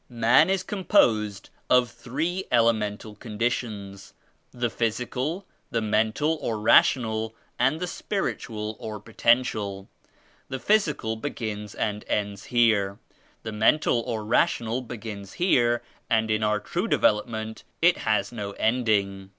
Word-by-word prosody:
"Man 120 +7 +4
is 190 -1 +1
composed 115 - +1 0.2
of 125 -1 +4
three 155 +10 -3
elemental 110 -3 +1
condi 115 +2 -1
tions, 100 -5 -6 0.2
— - - -43
the 120 -2 -2
physical, 125 - -2 0.2
the 115 - 0
mental 110 +9 +1
or 115 - -2
rational, 110 0 +3 0.2
and 135 +6 +2
the 180 - -1
spiritual 110 - -3
or 110 -1 -6
potential. 105 -3 0 0.6
The 130 - -3
physical 150 - +1
begins 110 -5 -5
and 105 -1 -2
ends 100 -2 -2
here, 110 -5 +2 0.5
the 110 - -4
mental 120 +5 +3
or 110 -2 -4
rational 115 +1 +1
begins 110 -5 -8
here, 120 -10 +2 0.3
and 110 -1 +2
in 110 0 +1
our 105 0 +1
true 175 - -3
development 110 - 0 0.2
it 175 +1 +4
has 105 -2 0
no 100 -4 -5
ending. 100 -5 0
110 Hz, 125 wpm, -26 LUFS, 105-125 Hz, 0.6 s, Man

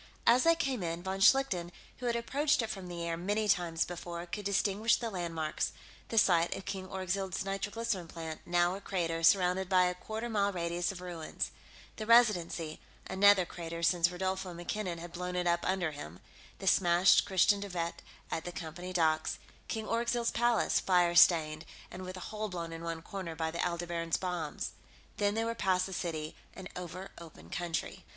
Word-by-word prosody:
As 245 +4 +5
they 330 0 +6
came 270 - -1
in, 170 0 -3
von 190 +1 -3
Schlichten, 195 -6 +4 0.3
who 250 - -4
had 235 - +1
approached 285 +4 +1
it 220 - -2
from 190 -2 -6
the 170 -1 -5
air 165 0 -1
many 205 +5 -1
times 175 -4 +2
before, 175 -1 -6
could 205 +3 -6
distinguish 200 +2 +2
the 230 -2 -4
landmarks 165 -4 -2 0.3
the 225 - -4
site 175 -5 +4
of 195 - -8
King 190 -1 -4
Orgzild's 190 0 -2
nitroglycerin 195 -1 -2
plant, 160 -1 -7
now 175 0 +2
a 195 - -6
crater 170 -4 -2
surrounded 180 +1 +4
by 185 -1 +5
a 180 - +1
quarter 220 +5 -5
mile 200 -3 +1
radius 170 -1 -1
of 185 -2 -9
ruins; 175 -3 -4 0.5
the 215 - -5
Residency, 180 -9 +3 0.3
another 195 -1 +5
crater 170 -1 -6
since 175 0 +4
Rodolfo 185 0 -3
MacKinnon 175 +1 -3
had 170 +1 -8
blown 180 +1 -4
it 180 0 0
up 170 0 +3
under 180 -3 0
him; 90 - -9 0.4
the 195 - -8
smashed 180 0 +5
Christiaan 195 +2 +4
De 200 - -5
Wett 170 -2 -2 0.4
at 160 - -2
the 175 - -5
Company 175 +2 -6
docks; 160 -3 +1 0.3
King 220 -1 -3
Orgzild's 235 +1 0
Palace, 240 -2 +2
fire 175 -2 +3
stained 160 -3 +5 0.3
and 185 - -7
with 185 0 -6
a 185 - -7
hole 215 0 -3
blown 170 -3 -5
in 165 0 -7
one 165 -1 -4
corner 185 -5 -6
by 160 0 -2
the 170 - -2
Aldebaran's 170 -1 -1
bombs.... 175 -5 -3 0.5
Then 205 0 +1
they 225 0 0
were 230 - -1
past 185 -4 +1
the 190 - -6
city 160 -4 -3 0.2
and 190 -1 -7
over 180 +1 -7
open 150 - -13
country. 170 -2 -3
180 Hz, 185 wpm, -32 LUFS, 170-200 Hz, 0.5 s, they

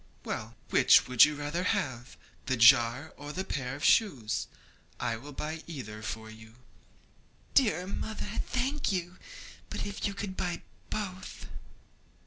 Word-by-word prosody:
'Well, 110 +2 -4 0.2
which - - +6
would 125 -2 +8
you 150 0 -2
rather 145 +4 -2
have 125 -8 -2 0.3
that 130 -2 +1
jar 120 +4 +5
or 145 0 -8
a 190 - 0
pair 135 -8 -3
of 145 - -3
shoes? 135 - +2 0.5
I 115 - -1
will 135 +6 -9
buy 155 +3 -5
either 110 -10 -7
for 110 -1 -5
you.' 110 0 -14 1.0
'Dear 195 - +3
mother, 210 +2 -4
thank 265 +2 0
you! 180 -1 -3 0.5
but - - -4
if 200 0 -2
you 200 - -5
could 200 -2 -4
buy 175 -2 -3 0.3
both?' 185 -3 -5
150 Hz, 140 wpm, -30 LUFS, 120-190 Hz, 1.0 s, would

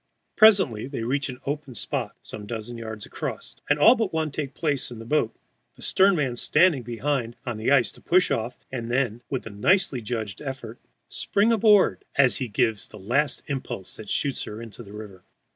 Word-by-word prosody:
Presently 190 - +5
they 135 -5 -4
reach 135 +4 -1
an 125 - -6
open 140 -3 -4
spot - - -3
some 105 -1 -7
dozen 115 +1 -5
yards 110 -2 -6
across, - - -6
and 145 - +4
all 220 +11 +8
but 225 -6 -1
one 160 -2 -1
take 140 -1 -4
places 145 -5 -1
in 120 - -8
the 115 - -9
boat, 120 -3 +1 0.4
the - - -12
stern 195 0 +4
man 135 -6 0
standing 150 +3 +3
behind 120 0 -2
on 120 -3 -3
the 110 - -1
ice 135 -4 +4
to - - -18
push 180 +1 +3
off, 115 +2 -1
and 120 -3 -4
then, 120 -2 0
with 130 - -3
nicely 125 - +1
judged 110 -3 -4
effort, 130 -5 -6 0.3
spring 210 +3 +1
aboard 210 -3 +4
as 135 -3 +4
he 130 - -2
gives 110 0 0
the 105 - -12
last 125 +9 0
impulse 130 -9 -5
that 110 - -9
shoots 140 -2 -1
her 105 - -7
into 115 -1 -9
the 100 -4 -12
river. 105 -4 -10
125 Hz, 195 wpm, -25 LUFS, 115-150 Hz, 0.4 s, all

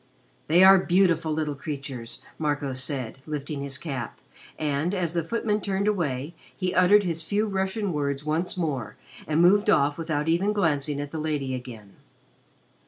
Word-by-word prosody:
"They 170 +4 +5
are 190 0 +9
beautiful 175 -3 +2
little 155 -1 -1
creatures," 135 -4 -6 0.2
Marco 145 -3 -1
said, 130 -2 -2
lifting 145 -1 -4
his 140 -1 -3
cap, 135 -7 -5 0.4
and, 155 +5 -1
as 170 -3 -1
the 170 -1 0
footman 210 +3 -1
turned 195 0 -1
away, 155 -7 -1 0.2
he 185 -1 -1
uttered 195 +3 +5
his 165 -3 -2
few 205 +6 0
Russian 195 0 -2
words 140 -1 -2
once 160 +5 -1
more 140 - -2 0.3
and 155 +3 +3
moved 205 +4 +5
off 145 -3 +3
without 155 -2 -2
even 180 +6 +2
glancing 150 -7 0
at 145 0 -5
the 160 - -4
lady 150 -4 -2
again. 115 -5 -8
155 Hz, 160 wpm, -26 LUFS, 140-185 Hz, 0.4 s, are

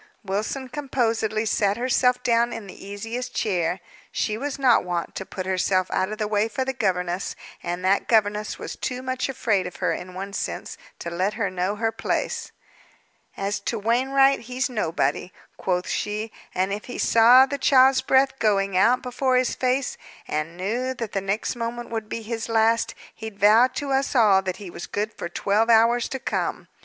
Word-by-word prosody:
Wilson 215 +7 -3
composedly 230 -5 -1
sat 205 -1 +1
herself 250 0 +2
down 235 0 +2
in 225 - -6
the 195 0 -11
easiest 225 +5 -5
chair. 180 -3 0 0.3
She 215 - -1
was 280 +5 -4
not 260 -4 +4
wont 175 -1 -3
to 190 - -6
put 185 - -5
herself 185 0 +1
out 190 +2 0
of 215 - -4
the 215 -1 -1
way 210 +1 +1
for 260 +3 -2
the 265 - -2
governess; 180 -5 -1 0.3
and 175 +1 -4
that 195 +1 +2
governess 210 -2 +1
was - - -6
too 255 0 -4
much 260 +1 -2
afraid 210 -8 0
of 180 - -9
her, - - 0
in 180 0 -7
one 195 +1 -6
sense, - - -4 0.2
to 170 - -6
let 185 +4 -1
her 210 -4 -1
know 185 +2 -1
her 225 +1 0
place. - - -2 0.9
"As 195 +1 -2
to 225 +3 -3
Wainwright, 265 +5 +3
he's 255 +3 -3
nobody," 180 -4 -1 0.2
quoth 180 -1 -1
she. 210 +1 -2 0.2
"And 190 +2 0
if 210 - -5
he 245 - -7
saw 240 +3 +7
the 280 +1 -4
child's 265 -1 +5
breath 265 0 +2
going 195 -3 +1
out 235 +7 +4
before 255 +1 0
his 255 -1 +2
face, 255 +1 0 0.3
and 155 +3 -3
knew 240 +8 -2
that 230 -4 -5
the 195 - -1
next 195 +6 -2
moment 235 0 -5
would 220 -2 -4
be 230 - -4
his 225 +1 -4
last, 225 +1 +2 0.2
he'd 220 -2 -8
vow 215 +5 +6
to 285 -2 -3
us 270 +1 0
all 210 -5 +5
that 185 -1 -4
he 195 -4 -9
was 170 - -7
good 210 +2 -3
for 170 - -6
twelve 205 +5 +1
hours 230 +1 +4
to 265 - -3
come. - - -3
220 Hz, 190 wpm, -24 LUFS, 195-250 Hz, 0.9 s, saw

